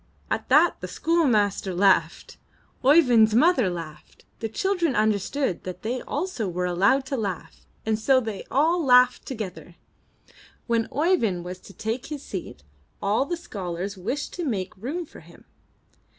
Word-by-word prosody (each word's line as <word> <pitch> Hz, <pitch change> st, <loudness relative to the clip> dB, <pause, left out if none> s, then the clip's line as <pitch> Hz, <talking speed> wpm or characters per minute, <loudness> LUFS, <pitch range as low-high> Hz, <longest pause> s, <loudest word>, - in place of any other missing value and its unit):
At -, -, -2 dB
that -, -, +4 dB
the -, -, -5 dB
schoolmaster 215 Hz, -, +1 dB
laughed; 180 Hz, -3 st, +2 dB, 0.5 s
Oey 290 Hz, +6 st, +7 dB
vind's 225 Hz, -6 st, +4 dB
mother 260 Hz, -, +4 dB
laughed; 165 Hz, -3 st, -9 dB
the 225 Hz, -, -3 dB
children 350 Hz, -, 0 dB
understood 215 Hz, +2 st, 0 dB
that 185 Hz, 0 st, -7 dB
they 245 Hz, +3 st, -2 dB
also 290 Hz, -, -3 dB
were 180 Hz, +1 st, -2 dB
allowed 190 Hz, +10 st, +2 dB
to 270 Hz, -, -3 dB
laugh, 200 Hz, -6 st, -5 dB, 0.2 s
and 220 Hz, -1 st, 0 dB
so 260 Hz, +4 st, +4 dB
they 220 Hz, -5 st, -5 dB
all 325 Hz, +6 st, +2 dB
laughed 250 Hz, -2 st, +4 dB
together. 180 Hz, -, -7 dB, 0.9 s
When 230 Hz, -1 st, 0 dB
Oeyvind 265 Hz, -, +1 dB
was 180 Hz, +1 st, -7 dB
to 195 Hz, -, -15 dB
take 230 Hz, +6 st, -4 dB
his 290 Hz, -2 st, -6 dB
seat, 175 Hz, -, -7 dB, 0.4 s
all 210 Hz, +7 st, +1 dB
the 345 Hz, -, -2 dB
scholars 195 Hz, -, -5 dB
wished 235 Hz, +10 st, -4 dB
to 355 Hz, -, -4 dB
make 195 Hz, -, -3 dB
room 290 Hz, -, -4 dB
for -, -, -14 dB
him. -, -, -18 dB
225 Hz, 150 wpm, -25 LUFS, 190-280 Hz, 0.9 s, Oey